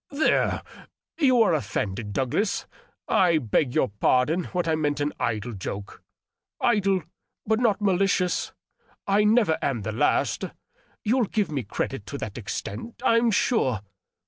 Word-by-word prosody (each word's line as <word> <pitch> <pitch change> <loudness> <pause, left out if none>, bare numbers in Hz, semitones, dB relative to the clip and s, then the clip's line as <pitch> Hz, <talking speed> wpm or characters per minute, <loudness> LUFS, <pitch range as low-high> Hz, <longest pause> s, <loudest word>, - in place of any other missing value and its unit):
" - - -67
There! 290 +2 +1 0.6
you 255 -6 +5
are 190 - +2
offended, 105 -5 -2
Douglas. 135 - 0 0.4
I 175 -3 +4
beg 125 0 0
you - - +4
to 130 - -1
pardon 150 - +2
what 180 -2 -2
I 160 - +2
meant 145 -2 0
in 145 +1 -1
idle 115 +1 -2
joke. 100 0 -6 0.6
Idle, 195 -6 +2 0.4
but 220 +1 +2
not 220 -4 +2
malicious. 190 -2 +1 0.5
I 200 +1 +3
never 210 -6 +3
am 120 -7 -1
the 110 - -3
last; 110 - +1 0.6
you'll 235 +2 +2
give 205 -4 -1
me 140 -3 -1
credit 100 - -4
to - - -5
that - - -6
extent, 230 - -6
I'm 230 +1 +4
sure. 165 - +1
175 Hz, 145 wpm, -25 LUFS, 125-210 Hz, 0.6 s, you